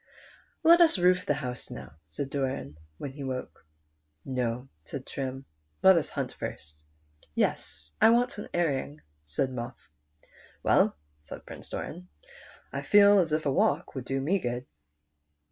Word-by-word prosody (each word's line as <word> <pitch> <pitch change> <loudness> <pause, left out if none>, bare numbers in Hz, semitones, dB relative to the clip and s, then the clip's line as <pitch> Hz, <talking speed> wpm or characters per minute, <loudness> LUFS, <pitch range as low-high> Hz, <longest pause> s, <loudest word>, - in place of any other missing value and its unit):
" - - -33
Let 340 +2 +8
us 330 -10 +6
roof 180 0 +3
the 145 - +2
house 125 -4 -5
now," - - -9
said 135 - -5
Doran, 130 - -2 0.2
when 140 - -5
he 140 +1 -8
woke. 130 - -5 0.3
" 75 0 -46
No," 125 -1 -2 0.2
said 130 - -6
Trim, 135 0 -5 0.2
'* 75 0 -43
let 190 0 +9
us 165 -4 +1
hunt - - -3
first." 75 +1 -7 0.3
" 75 0 -32
Yes, 75 +1 -1
I - - +8
want 240 -1 +2
an - - -7
airing," 150 -3 -1 0.3
said 130 - 0
Muff. 120 0 -5 0.5
" - - -26
Well," - - +4 0.2
said 75 - -10 0.3
Doran, 180 +3 -6 0.3
" - - -22
I - - -2
feel 205 0 +7
as 165 -4 +1
if 155 0 0
a 140 - +2
walk - - +1
would 130 -3 -5
do 135 +1 -1
me 170 +9 +1
good." 120 -3 -3
135 Hz, 170 wpm, -29 LUFS, 120-175 Hz, 0.5 s, let